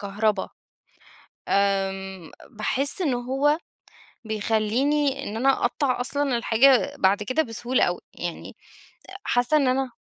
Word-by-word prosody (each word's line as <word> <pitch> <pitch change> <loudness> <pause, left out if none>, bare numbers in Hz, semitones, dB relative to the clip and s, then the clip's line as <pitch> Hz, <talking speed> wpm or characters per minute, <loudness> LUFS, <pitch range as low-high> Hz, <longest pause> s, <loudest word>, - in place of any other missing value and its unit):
كهربا، 205 0 -1 1.0
آمم 195 -3 -1 0.2
باحس 265 - 0
إن 285 -7 +1
هو 270 +5 +1 0.7
بيخليني 240 +7 0
إن 215 - -6
أنا 265 +3 +2 0.2
أقطع 255 +1 0
أصلًا 275 -1 0
الحاجة 260 +4 +3
بعد 195 +2 +2
كده 255 +9 0
بسهولة 240 +2 -1
أوي، 175 - -1
يعني 175 -1 -6 0.7
حاسّة 245 +5 +2
إن 280 -3 +2
أنا 260 0 0
245 Hz, 115 wpm, -24 LUFS, 205-275 Hz, 1.0 s, الحاجة